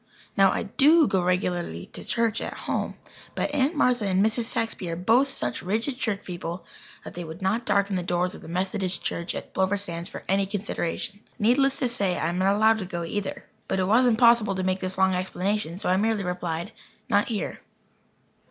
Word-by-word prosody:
Now, - - +5
I - - -1
do 310 +3 +5
go 190 - +1
regularly 175 - -1
to - - -8
church 230 -2 0
at - - -4
home. - - -2 0.4
But 295 - -1
Aunt 290 +3 +2
Martha 250 -5 +2
and 190 +1 +3
Mrs. 225 +1 +1
Saxby 225 -6 -2
are 165 - -2
both 225 +10 +3
such 120 - -2
rigid 225 +8 -2
church 205 -3 -2
people 175 0 -6 0.4
that - - -9
they 175 - -5
would 160 +1 -8
not 220 +5 0
darken 200 -1 +2
the 180 - 0
doors 175 +1 0
of - - -11
the - - -11
Methodist 185 +2 -2
church 170 0 -3
at - - -7
Plover 190 +1 +1
Sands 170 -4 -4
for - - -8
any 195 +1 +2
consideration. 200 0 -3 0.2
Needless 265 +5 +3
to 255 - 0
say, 200 -6 +1
I 160 - 0
am 175 +1 -2
not 195 +2 +3
allowed 220 +1 +4
to 195 - -4
go 175 -1 -4
either. 200 +4 -4 0.2
But 190 - 0
it - - +2
was 230 +6 +4
impossible 235 -3 +4
to 185 - -2
make 185 0 0
this 185 0 -3
long 190 0 +3
explanation, 185 -1 -2
so - - -2
I 185 - +3
merely 215 0 +1
replied: 180 +1 -3 0.4
"Not 205 0 +2
here." 220 -4 -3
195 Hz, 205 wpm, -26 LUFS, 180-225 Hz, 0.4 s, Now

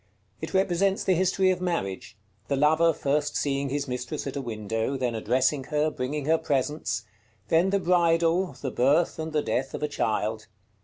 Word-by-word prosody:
It 160 - -5
represents 190 +1 +2
the 190 - +3
history 185 +1 +2
of 180 -1 -2
marriage: 165 - -3 0.3
the 140 - 0
lover 160 +4 +4
first 145 0 -1
seeing 140 -1 0
his 140 +1 -2
mistress 125 -1 -4
at 140 - -5
a 140 - -2
window, 115 +2 -3
then 125 -2 -1
addressing 130 +5 +1
her, 150 +1 0
bringing 140 +2 -3
her 160 +2 +3
presents; 150 0 -1 0.5
then 170 +4 +3
the 200 +1 +2
bridal, 170 0 +2
the 135 - -2
birth 145 +9 +2
and 160 0 -4
the 150 -1 0
death 135 +1 -2
of - - -5
a - - +2
child. 110 -5 -2
150 Hz, 175 wpm, -26 LUFS, 130-170 Hz, 0.5 s, lover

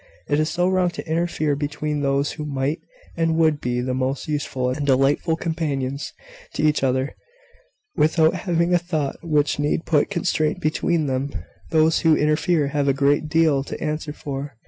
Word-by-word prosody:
It 145 - +1
is 155 +1 +1
so 175 +2 +1
wrong 185 -1 +2
to - - -6
interfere 160 -2 0
between 145 +1 -3
those 140 0 +1
who 155 - -6
might 140 +1 -2 0.4
and 165 -1 +1
would 155 -3 +2
be 125 0 -1
the 130 +1 -2
most 130 +1 -2
useful 135 -4 -1
and 145 +3 -3
delightful 140 +4 +2
companions 145 -5 -3 0.4
to - - -1
each 150 -1 +3
other, 130 +1 0 0.8
without 160 +1 +3
having 175 -2 0
a 175 - +5
thought 160 -5 -2
which 150 -4 +1
need 150 +2 0
put 150 -3 +2
constraint 170 -3 0
between 155 0 0
them! 135 +1 -2 0.4
Those 160 0 +3
who 160 -2 +4
so - - -1
interfere 150 0 +2
have 145 0 0
a 135 - +4
great 145 +3 +1
deal 155 -4 +3
to - - -7
answer 155 0 -3
for. 140 -3 -6
150 Hz, 175 wpm, -22 LUFS, 140-160 Hz, 0.8 s, a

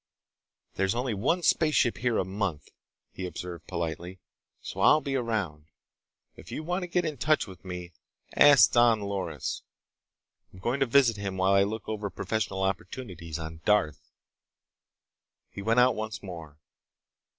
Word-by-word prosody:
"There's 95 +2 +1
only 125 -1 -1
one 145 - 0
spaceship 155 -8 +3
here 120 -1 0
a - - +1
month," 95 -6 -3 0.4
he 95 - -5
observed 85 -2 -7
politely, 85 +2 -4 0.4
"so - - -8
I'll 125 +10 +6
be 140 -3 -3
around. 100 - -2 0.7
If - - -13
you 155 - -4
want 180 +4 -2
to 180 - -4
get 175 0 0
in 155 -3 -3
touch 155 +4 +2
with 95 -5 -13
me, 90 -1 -7 0.4
ask 145 -2 +7
Don 120 -2 +4
Loris. 100 -2 -3 0.9
I'm - - -15
going 120 +8 -1
to 135 - +2
visit 120 -3 +4
him 100 -2 -4
while 95 +1 +3
I 100 - +5
look 105 +2 -2
over 105 -2 -3
professional 100 -1 -2
opportunities 90 -4 -4
on 80 0 -7
Darth." 75 -10 +1 1.4
He - - -7
went 115 +4 +2
out 125 +1 +5
once 110 -1 -5
more. 80 -6 -9
100 Hz, 150 wpm, -28 LUFS, 90-125 Hz, 1.4 s, ask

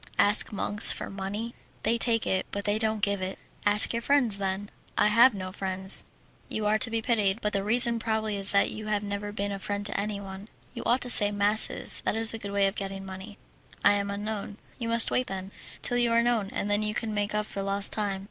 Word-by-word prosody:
"Ask 205 +1 +4
monks 205 0 +2
for - - -6
money? 205 +4 -6 0.3
They 235 +1 0
take 230 -1 +1
it, 190 0 -2
but 200 0 -5
they 205 +1 0
don't 220 -1 -2
give 200 -2 0
it." 185 +1 -5 0.3
"Ask 210 +3 +4
your 235 - -2
friends, 245 -6 +1
then." 195 +1 -4 0.3
"I - - +3
have 235 +2 +5
no 185 -1 -6
friends." 190 0 -1 0.4
"You 215 - -4
are 215 +1 +1
to 250 - +1
be 225 0 -3
pitied, 215 -4 0
but 210 -2 -3
the 195 - -1
reason 235 +2 +5
probably 220 -2 -2
is 195 0 -1
that 200 - +1
you 215 0 -8
have 210 -1 -1
never 205 0 -5
been 205 -1 -4
a 200 - -5
friend 205 0 -5
to 205 - +1
anyone. 200 -1 -6 0.3
You - - -7
ought 245 +2 +1
to 245 - -2
say 205 -3 +9
masses, 205 +1 +3
that - - -1
is 225 0 +6
a 225 - -6
good 200 - -7
way 200 0 +1
of 195 - -1
getting 195 -1 -6
money." 190 +2 -10 0.5
"I - - +7
am 200 0 -1
unknown." 205 0 -6 0.2
"You 230 -2 -4
must 230 0 +3
wait, 255 - 0
then, 190 0 -7 0.3
till 245 - -1
you 240 -1 +1
are 235 0 +3
known, 235 -4 0
and - - -4
then 205 +1 0
you 210 0 -2
can 220 -1 -3
make 205 0 -2
up 210 0 -1
for 200 - -6
lost 195 0 +3
time." 205 -3 -2
205 Hz, 235 wpm, -26 LUFS, 200-220 Hz, 0.5 s, say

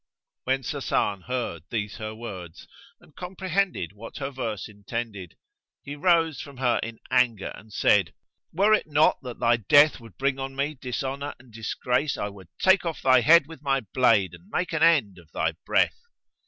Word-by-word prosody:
'" - - -65
When 135 +1 0
Sasan 115 - -1
heard 120 -10 -3
these 105 -3 -3
her 110 -1 -6
words 95 -8 -9 0.3
and 150 - -22
comprehended 185 - -2
what 110 +3 -10
her 140 -1 -4
verse 115 -6 -4
intended, 105 -3 -6 0.5
he 145 - -6
rose 165 -2 +2
from 140 -3 -11
her 125 -2 +1
in 115 0 -6
anger 115 -6 +2
and 110 - -14
said, - - +2 0.4
"Were 200 +5 +3
it 215 - +2
not 150 0 +3
that 125 -3 -7
thy 120 0 +3
death 145 +8 +5
would 115 -7 -15
bring 135 0 0
on 135 0 -5
me 140 +3 -1
dishonour 135 +2 -4
and 120 -2 -20
disgrace, 125 +5 -1
I 105 - -2
would 100 -3 -13
take 190 +1 +4
off 165 -2 -4
thy 130 -1 +6
head 165 +2 +6
with 160 -1 -12
my 135 -2 +1
blade 105 -8 +3
and 85 +3 -15
make 180 +5 -2
an 160 - -1
end 140 - +3
of 80 -3 -20
thy 80 +1 0 0.2
breath." - - +2
125 Hz, 180 wpm, -26 LUFS, 110-145 Hz, 0.5 s, thy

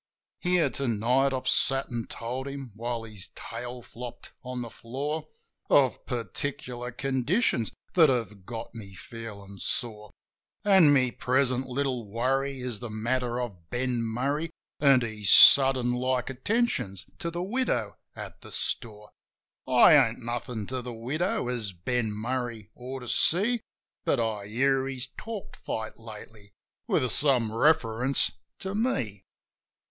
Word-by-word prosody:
Here, 180 -2 +2
to 140 - -1
night, 125 +5 +2
I've 130 -1 -3
sat 135 0 +2
an' 115 -1 -3
told 125 +3 -5
him 140 -3 -7
— - - -27
while 115 +1 -3
his 105 -4 -7
tail 125 0 -7
flopped 120 +1 -9
on 125 -1 -5
the 115 - -8
floor 145 +6 -4 0.2
— - - -46
Of 135 -4 +3
particular 125 +1 -4
conditions 130 - 0 0.2
that 165 -5 +6
have 115 -6 -2
got 115 +3 -7
me 100 -4 -10
feelin' 100 -1 -9
sore. 105 -3 +1 0.6
An' 190 -7 +6
my 130 -3 +3
present 130 0 0
little 125 -4 -2
worry 135 +4 -1
is 125 -4 -4
the 120 - -6
matter 120 +3 -1
of 95 -9 -6
Ben 125 -1 -1
Murray 135 +8 -1 0.3
An' 135 -3 +5
his 110 -4 -2
sudden 130 -3 +8
like 125 +1 -1
attentions 135 - -1
to 170 -3 -3
the 170 +1 -4
widow 190 - -1 0.2
at - - -9
the - - -12
store. 105 -2 -1 0.6
I - - +7
ain't - - +4
nothin' 120 -2 -4
to 130 +2 -3
the 120 -1 -7
widow, 140 +7 -2
as 115 -6 -3
Ben 110 +5 -1
Murray 115 0 -4
ought 130 +2 -7
to 125 - -9
see; 210 - +4 0.4
But - - +1
I 110 -3 -2
hear 135 +4 +1
he's 130 -1 -5
talked 220 -3 -7
fight 110 0 -5
lately, 110 -2 -12 0.3
with 130 - +2
some 125 -6 +4
reference 130 -1 +2 0.3
to 190 0 -5
me. 130 - -1
125 Hz, 145 wpm, -27 LUFS, 115-135 Hz, 0.6 s, sudden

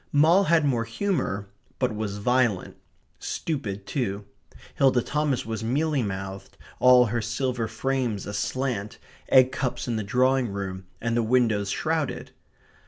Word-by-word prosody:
Moll 165 +7 +5
had 165 -3 +3
more 125 -5 +1
humour, 115 - -2 0.3
but 125 -4 0
was 105 -2 -3
violent; 120 -3 +1 0.4
stupid 105 -11 -4
too. 100 -6 -3 0.5
Hilda 130 -3 +3
Thomas 150 -3 -1
was 110 0 -4
mealy 145 +4 +1
mouthed, 95 -2 -6 0.2
all 125 0 +7
her 115 +1 -1
silver 115 +1 -2
frames 120 -1 -2
aslant; 105 +1 -3 0.3
egg 130 -1 +6
cups 130 -2 -3
in 115 -2 -1
the 110 - -2
drawing 130 +4 +2
room; 95 -2 -5
and 115 0 -1
the 120 - +3
windows 110 -4 +2
shrouded. 160 +4 -2
120 Hz, 135 wpm, -25 LUFS, 105-135 Hz, 0.5 s, all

